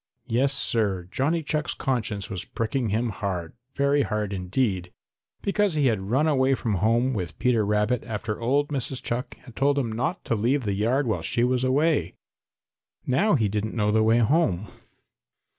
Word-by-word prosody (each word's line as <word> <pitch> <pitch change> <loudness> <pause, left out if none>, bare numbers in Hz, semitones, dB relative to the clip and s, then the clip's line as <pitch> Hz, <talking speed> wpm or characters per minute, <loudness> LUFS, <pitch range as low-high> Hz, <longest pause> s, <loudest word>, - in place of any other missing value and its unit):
Yes, 125 +3 +1
Sir, 100 -9 +1
Johnny 160 +7 0
Chuck's 150 0 -1
conscience 110 -6 -2
was 95 -4 -4
pricking 115 +1 -2
him 115 +4 0
hard, 95 -5 -4 0.2
very 140 +1 +2
hard 105 -5 -2
indeed, 95 -1 -1 0.5
because 200 -3 +1
he 150 -2 +2
had 105 -6 0
run 135 +7 +2
away 135 -3 +3
from 115 -4 -2
home 120 +4 +2
with 90 -8 -4
Peter 120 -4 +2
Rabbit 105 +3 +1
after 110 -1 -4
old 140 +5 +1
Mrs. 135 -2 -3
Chuck 120 +2 -3
had 120 -3 -13
told 140 +1 +2
him 125 -5 0
not 160 - -2
to - - 0
leave 120 +6 +1
the 100 -2 -1
yard 120 +8 +1
while 110 - -1
she 120 - 0
was 125 0 +1
away. 145 +5 +1 0.9
Now 170 +10 +3
he 110 -6 +2
didn't 105 +2 -3
know 105 -2 +1
the 110 +1 +3
way 110 +1 +4
home. 115 - +2
120 Hz, 175 wpm, -25 LUFS, 105-135 Hz, 0.9 s, way